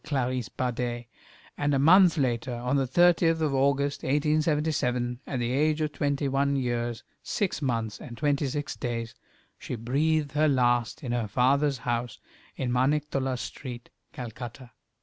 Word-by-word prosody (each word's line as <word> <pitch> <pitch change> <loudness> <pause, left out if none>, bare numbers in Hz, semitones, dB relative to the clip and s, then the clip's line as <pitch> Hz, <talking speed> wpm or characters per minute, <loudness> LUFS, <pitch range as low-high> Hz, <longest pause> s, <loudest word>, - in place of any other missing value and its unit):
Clarisse 130 -5 -1
Bader, 120 -1 -3 0.5
and 145 -1 +1
a - - +3
month 175 +5 +6
later, 125 -2 0
on 125 +3 -1
the 135 -2 +1
30th 165 +2 +4
of 155 -3 0
August, 140 +1 +1
1877, 150 -4 0
at 135 - -3
the 120 0 -1
age 150 +3 +2
of 155 -1 -1
twenty 145 0 -1
one 140 +1 +1
years, 120 -3 -2 0.2
six 195 -6 -2
months, 115 -5 -2
and 120 - -9
twenty 145 -1 +1
six 145 +2 -3
days, 115 -2 -4 0.5
she - - -5
breathed 145 +6 0
her 150 +2 +2
last 120 0 +1
in 125 - -3
her 120 -3 -1
father's 135 +5 +2
house 120 -1 -2 0.4
in 125 -2 -2
Maniktollah 135 0 0
Street, 125 -1 -7 0.2
Calcutta. 120 +1 -8
135 Hz, 150 wpm, -27 LUFS, 120-145 Hz, 0.5 s, month